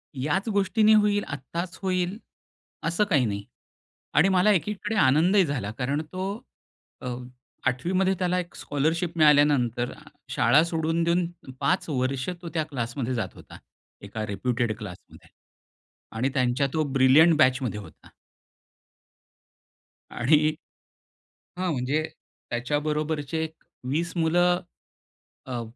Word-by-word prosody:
याच 145 - -1
गोष्टीने 210 +2 +3
होईल, 205 -1 +3
आत्ताच 170 +5 -5
होईल 185 0 -1 0.7
असं 170 +5 +1
काही 150 -11 +2
नाही. 100 -2 -3 0.7
आणि 170 +6 +5
मला 190 +2 +4
एकीकडे 210 +3 -1
आनंदही 175 +5 +4
झाला 125 -9 -3
कारण 140 +4 0
तो 190 +1 -2 0.7
अ, - - -6 0.6
8वीमध्ये 185 +9 +1
त्याला 180 0 +1
एक 175 -1 -7
स्कॉलरशिप 165 +4 -1
मिळाल्यानंतर 145 -6 +4 0.4
शाळा 120 +6 +4
सोडून 165 0 0
देऊन 170 +1 +2 0.3
5 165 +6 0
वर्ष 130 0 -1
तो 170 - -6
त्या 160 - +2
क्लासमध्ये 130 -2 -3
जात 115 - -3
होता, - - -13 0.4
एका 110 +2 -5
रेप्युटेड 115 +2 -1
क्लासमध्ये. 95 -4 -11 0.9
आणि 130 +4 +1
त्यांच्या 130 +1 +1
तो 155 - +1
ब्रिलियंट 140 +5 +6
बॅचमध्ये 130 -5 +2
होता. 100 - -14 2.0
आणि 155 +5 +3 1.1
हां 185 -1 0
म्हणजे 140 +3 0 0.5
त्याच्याबरोबरचे 150 +4 -1
एक 160 0 -8 0.3
20 165 +6 -1
मुलं, 175 +2 +3 0.9
अ, 125 -2 -3
155 Hz, 110 wpm, -26 LUFS, 130-175 Hz, 2.0 s, ब्रिलियंट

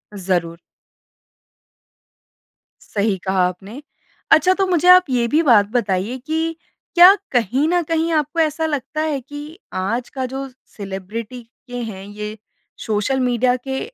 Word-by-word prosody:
ज़रूर। 175 -3 -2 2.3
सही 200 -2 +1
कहा 190 -1 +2
आपने। 195 +9 -8 0.5
अच्छा 370 - +6
तो 385 - +2
मुझे 355 -1 +1
आप 365 0 +8
ये 240 -2 +1
भी 305 +7 +2
बात 230 -8 +5
बताइए 215 0 -1
कि 315 +1 0 0.6
क्या 355 +3 +9 0.2
कहीं 250 +5 +1
न 355 0 +2
कहीं 330 0 0
आपको 305 +1 0
ऐसा 320 0 +1
लगता 295 0 -3
है 280 - -1
कि 290 +3 -9 0.4
आज 235 +5 -2
का 260 - -1
जो 270 0 -4 0.3
सेलिब्रिटी 210 +5 -6 0.3
के 245 - -6
हैं, 195 -2 -9
ये 210 +1 -7 0.5
सोशल 220 +5 0
मीडिया 250 0 +2
के 265 0 -2
245 Hz, 140 wpm, -20 LUFS, 205-300 Hz, 2.3 s, क्या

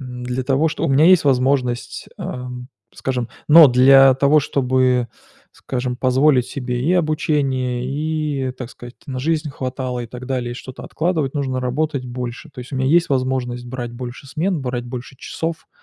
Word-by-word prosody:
м, 125 -2 -7
для 125 +1 -2
того 140 +5 +2
чтобы 150 - -2
у - - +2
меня 150 +5 +5
есть 185 -4 +6
возможность, 130 -2 0
ам, 125 0 -6 0.3
скажем, 125 -3 -3 0.2
но 155 -1 +9
для 135 +1 +7
того 140 +3 +4
чтобы, 130 -3 +1 0.4
скажем, 125 -1 -4
позволить 130 0 +3
себе 125 -2 -4
и 170 +6 +2
обучение, 145 -7 0
и, 150 -1 -2
так 125 -1 -8
сказать, 120 0 -12
на 130 -2 -5
жизнь 155 +1 -1
хватало 130 -2 -4
и 120 - -5
так 125 +2 -9
далее, 125 -2 -2
и - - -7
что-то 130 +1 -9
откладывать, 155 -5 -1
нужно 130 -3 -2
работать 135 +1 -2
больше. 125 +4 -6
То 135 -3 -10
есть 125 +3 -11
у - - -2
меня 130 0 0
есть 170 +3 +3
возможность 130 -2 -1
брать 120 -1 -5
больше 125 +2 -8
смен, 165 +4 -1
брать 125 -1 -3
больше 125 +2 -8
часов. 165 +5 -5
130 Hz, 175 wpm, -20 LUFS, 125-145 Hz, 0.4 s, но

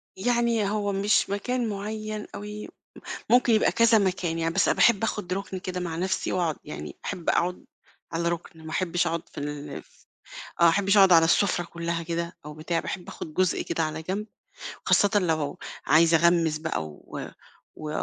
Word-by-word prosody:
يعني 235 0 +1
هو 205 -1 -1
مش 200 +1 +2
مكان 235 +4 -1
معيّن 215 +1 -4
أوي، 210 +1 -7 0.6
ممكن 245 0 +5
يبقى 215 - +4
كذا 230 -1 +5
مكان 180 -4 0
يعني، 165 0 -1
بس 195 - +3
باحب 230 -4 +4
آخد 210 -5 -3
ركن 195 0 -3
كده 180 0 -4
مع 170 -2 -3
نفسي، 185 +3 -1
وأقعد 170 -4 0
يعني 150 - -7
أحب 175 - -5
أقعد 180 +1 0 0.5
على 170 +1 0
ركن، 165 -1 -5
ما - - -6
أحبش 175 0 0
أقعد 165 0 -3
في - - -11
ال 145 0 -5 0.9
آه، - - +7
ما 170 - +8
أحبش 195 +4 +2
أقعد 195 -2 +7
على 165 -1 +7
السفرة 175 +1 +2
كلّها 170 0 -3
كده 170 +1 -4
أو 150 - -7
بتاع، 160 +2 -2
باحب 180 - -5
أخد 155 - -8
جزء 185 0 +1
كده 165 - -1
على 155 0 -3
جنب، 195 +6 -3 0.6
وخاصةً 205 +1 +4
لو 160 -6 -1 0.3
عايزة 165 +2 +5
أغمّس 170 -2 +3
بقى، 155 - -2
و 75 -1 -8 0.5
و 155 - -6
180 Hz, 175 wpm, -26 LUFS, 165-205 Hz, 0.9 s, ما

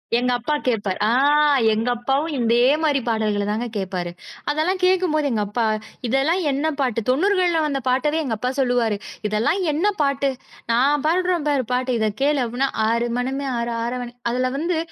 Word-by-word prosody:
எங்க 250 +1 +1
அப்பா 275 +6 -2
கேப்பார். 205 -6 0
ஆ - - +2 0.6
எங்க 225 +3 -1
அப்பாவும் 275 +6 -1
இதே 235 0 +2 0.2
மாரி 290 -3 +2
பாடல்கள 215 -3 0
தாங்க 220 +3 -1
கேட்பாரு. 185 -3 -3 0.4
அதெல்லாம் 325 +6 0
கேட்கும்போது 365 -5 +2
எங்க 215 -2 0
அப்பா, 225 +3 -1 0.4
"இதெல்லாம் 275 +9 +1
என்ன 285 +4 0
பாட்டு?" 245 -4 0
90கள்ல 355 +3 +2
வந்த 280 -2 -1
பாட்டவே 295 +5 +1
எங்க 235 -5 -2
அப்பா 250 +3 -2
சொல்லுவாரு, 245 -5 +1 0.3
"இதெல்லாம் 220 - 0
என்ன 330 +8 +1
பாட்டு? 275 -1 +1 0.4
நா 230 - +3 0.3
பாடுறேன் 355 -1 +1
பாரு 280 -3 +1
பாட்டு. 255 0 0
இத 215 -1 +1
கேளு." 290 0 +2
அப்படீன்னா. 245 +4 -1 0.2
"ஆறு 235 +1 +1
மனமே 270 +3 -2
ஆறு. 235 0 -2
ஆறவன்" 245 0 -4 0.2
அதுல 255 +1 0
வந்து 335 +2 -1
255 Hz, 160 wpm, -22 LUFS, 230-300 Hz, 0.6 s, நா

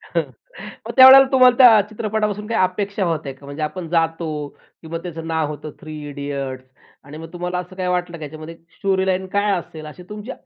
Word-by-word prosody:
हं, - - -1 0.6
मग - - -4
त्यावेळेला 265 +1 +10
तुम्हाला 255 -2 +6
त्या 235 -5 +8
चित्रपटापासून 210 -1 -3
काही 230 - -1
अपेक्षा 200 +2 -2
होत्या 155 -5 -3
का? 140 - -17
म्हणजे 140 +2 -8
आपण 170 +2 -4
जातो 165 -1 0 0.5
किंवा 165 0 -6
त्याचं 165 -2 -7
नाव 160 -2 -1
होतं 150 0 -7
थ्री 155 0 -9
इडियट्स. 140 -2 -5 0.4
आणि 145 +3 -11
मग 165 +2 -10
तुम्हाला 180 +1 -4
असं 180 +1 -9
काही 185 -1 -2
वाटलं, 180 -1 -2
की - - -16
ह्याच्यामध्ये 155 +3 -9 0.2
स्टोरी 190 -1 0
लाईन 190 0 -1
काय 205 0 +2
असेल? 155 -2 -11
अशी 155 +4 -11
तुमची 210 +4 -7
175 Hz, 190 wpm, -20 LUFS, 155-205 Hz, 0.6 s, त्यावेळेला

